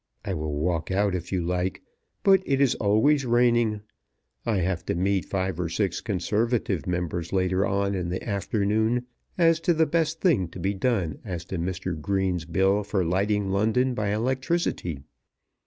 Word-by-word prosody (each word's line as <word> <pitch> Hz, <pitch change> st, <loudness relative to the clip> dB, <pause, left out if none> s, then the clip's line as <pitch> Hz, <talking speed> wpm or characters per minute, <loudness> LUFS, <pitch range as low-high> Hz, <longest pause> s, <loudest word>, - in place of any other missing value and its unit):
I -, -, -2 dB
will 75 Hz, -1 st, -3 dB
walk 85 Hz, +1 st, -1 dB
out 100 Hz, +1 st, +1 dB
if 90 Hz, -1 st, -4 dB
you 90 Hz, -3 st, 0 dB
like, 90 Hz, +1 st, -2 dB, 0.4 s
but 195 Hz, -1 st, +6 dB
it 135 Hz, -1 st, +2 dB
is 140 Hz, -3 st, +4 dB
always 115 Hz, +8 st, +3 dB
raining. 120 Hz, -3 st, +2 dB, 0.7 s
I 110 Hz, -3 st, +2 dB
have 90 Hz, -1 st, -1 dB
to -, -, 0 dB
meet 95 Hz, +1 st, +1 dB
five 95 Hz, -3 st, -2 dB
or 85 Hz, -2 st, -1 dB
six 95 Hz, +1 st, -1 dB
conservative 105 Hz, -1 st, -1 dB
members 90 Hz, -1 st, -2 dB
later 95 Hz, 0 st, +1 dB
on 100 Hz, 0 st, 0 dB
in 90 Hz, -3 st, -2 dB
the 90 Hz, +5 st, -4 dB
afternoon 110 Hz, +3 st, 0 dB, 0.3 s
as 165 Hz, -2 st, +4 dB
to 170 Hz, 0 st, +1 dB
the 160 Hz, 0 st, +4 dB
best 160 Hz, 0 st, 0 dB
thing 140 Hz, -, +2 dB
to 90 Hz, -, -10 dB
be 95 Hz, +3 st, 0 dB
done 95 Hz, -, -1 dB
as 90 Hz, -5 st, -5 dB
to 90 Hz, -1 st, -4 dB
Mr. 90 Hz, +1 st, -3 dB
Green's 95 Hz, -1 st, 0 dB
Bill 95 Hz, +4 st, +2 dB
for 100 Hz, -3 st, -1 dB
lighting 100 Hz, +3 st, 0 dB
London 110 Hz, +6 st, +2 dB
by 105 Hz, -3 st, -2 dB
electricity. 130 Hz, -, -1 dB
100 Hz, 170 wpm, -26 LUFS, 90-115 Hz, 0.7 s, but